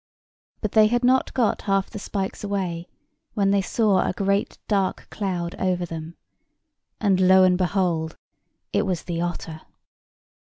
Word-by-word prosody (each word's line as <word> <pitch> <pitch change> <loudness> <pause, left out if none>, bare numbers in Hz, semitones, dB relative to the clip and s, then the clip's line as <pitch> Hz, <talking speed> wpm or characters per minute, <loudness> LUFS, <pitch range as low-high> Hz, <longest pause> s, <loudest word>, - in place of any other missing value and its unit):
But 210 - -2
they 215 -1 +6
had 240 +2 0
not 255 +1 +3
got 240 -4 +1
half 195 -1 +1
the 210 - -6
spikes 195 0 -4
away 185 -4 -3 0.5
when 195 -2 +2
they 200 0 +3
saw 205 -1 +2
a - - 0
great 200 +1 0
dark 195 -3 0
cloud 180 -4 -3
over 180 -1 0
them: 165 0 -7 0.8
and 195 -3 +2
lo, 185 0 +6
and 185 -1 +5
behold, 180 -3 0 0.6
it - - +1
was 180 -3 -2
the 170 -1 -3
otter. 170 -2 -4
190 Hz, 150 wpm, -24 LUFS, 175-200 Hz, 0.8 s, they